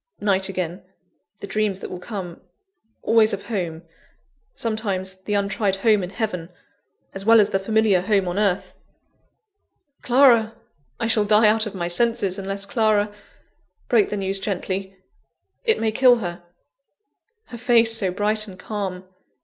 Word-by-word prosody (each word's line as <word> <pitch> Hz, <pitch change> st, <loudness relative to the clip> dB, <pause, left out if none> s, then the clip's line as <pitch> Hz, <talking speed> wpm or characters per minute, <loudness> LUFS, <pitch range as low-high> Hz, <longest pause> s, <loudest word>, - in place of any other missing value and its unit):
Night 195 Hz, -2 st, +1 dB
again 180 Hz, -1 st, -4 dB, 0.6 s
the -, -, -5 dB
dreams 205 Hz, -1 st, -1 dB
that -, -, -8 dB
will 180 Hz, -, -6 dB
come 180 Hz, -3 st, -7 dB, 0.6 s
always 225 Hz, -1 st, +4 dB
of 200 Hz, -, -4 dB
home; 175 Hz, -7 st, -4 dB, 0.7 s
sometimes, 200 Hz, -5 st, -2 dB
the 210 Hz, -, -1 dB
untried 200 Hz, 0 st, 0 dB
home 210 Hz, +1 st, +2 dB
in 180 Hz, -, -5 dB
heaven, 185 Hz, -5 st, -4 dB, 0.6 s
as 195 Hz, -, -4 dB
well 225 Hz, +2 st, +6 dB
as 205 Hz, -, +3 dB
the 195 Hz, -, +1 dB
familiar 215 Hz, -2 st, +2 dB
home 195 Hz, -1 st, +1 dB
on 175 Hz, +3 st, -2 dB
earth 190 Hz, -2 st, 0 dB, 1.3 s
Clara! 240 Hz, -3 st, +4 dB, 0.4 s
I 230 Hz, -, -1 dB
shall 225 Hz, -2 st, +2 dB
die 210 Hz, +1 st, +5 dB
out 220 Hz, +1 st, +2 dB
of 205 Hz, -, -8 dB
my 175 Hz, -2 st, -3 dB
senses, 200 Hz, 0 st, 0 dB
unless 195 Hz, +1 st, -3 dB
Clara 210 Hz, -1 st, +1 dB, 0.8 s
break 225 Hz, -4 st, +3 dB
the 210 Hz, -, -3 dB
news 195 Hz, 0 st, -1 dB
gently 195 Hz, -1 st, -4 dB, 0.7 s
it 450 Hz, -, +2 dB
may 225 Hz, -1 st, 0 dB
kill 250 Hz, +2 st, +5 dB
her 175 Hz, -6 st, -5 dB, 1.1 s
Her 235 Hz, -, -9 dB
face 230 Hz, -2 st, +4 dB
so 195 Hz, -4 st, +1 dB
bright 210 Hz, +3 st, 0 dB
and 190 Hz, -2 st, -11 dB
calm! 190 Hz, -2 st, -5 dB
205 Hz, 150 wpm, -22 LUFS, 190-220 Hz, 1.3 s, well